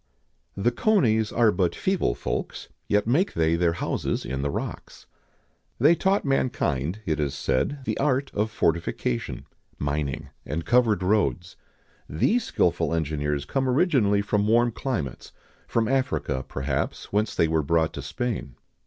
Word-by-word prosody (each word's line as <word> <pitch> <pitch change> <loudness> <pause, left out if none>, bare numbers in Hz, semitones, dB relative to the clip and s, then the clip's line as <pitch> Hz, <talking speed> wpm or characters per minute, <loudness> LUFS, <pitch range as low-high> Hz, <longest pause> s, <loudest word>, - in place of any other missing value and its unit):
"The 105 +5 +2
conies 120 - +2
are 115 -2 +4
but 90 -4 0
feeble 185 - 0
folks, - - -4 0.2
yet 105 0 +2
make 145 - +1
they 80 0 +2
their 85 -1 +2
houses - - -2
in 65 +1 -3
the 70 - -1
rocks."[XIX - - -6 0.7
101] 145 +7 +5
They - - +5
taught 195 +1 +1
mankind, 90 - 0
it 80 -1 -1
is 70 -2 -1
said, 135 - -1
the - - -2
art 135 -1 +1
of 105 +2 0
fortification, 85 - -1 0.3
mining, 70 0 -2
and 80 +5 -4
covered 115 -6 +3
roads.[XIX 90 -3 0 0.5
102] 75 - 0
These 240 0 +2
skilful 85 -1 +1
engineers 75 -2 -1
come 135 - 0
originally 125 - +3
from 105 0 +1
warm 120 +2 +4
climates; 110 - -4 0.3
from 115 -1 +1
Africa, 130 - -1
perhaps, 70 +5 -3
whence 105 +1 +1
they 85 - +3
were 80 0 +1
brought 80 +2 +1
to 70 - -5
Spain. 70 - -4
100 Hz, 150 wpm, -25 LUFS, 75-125 Hz, 0.7 s, 101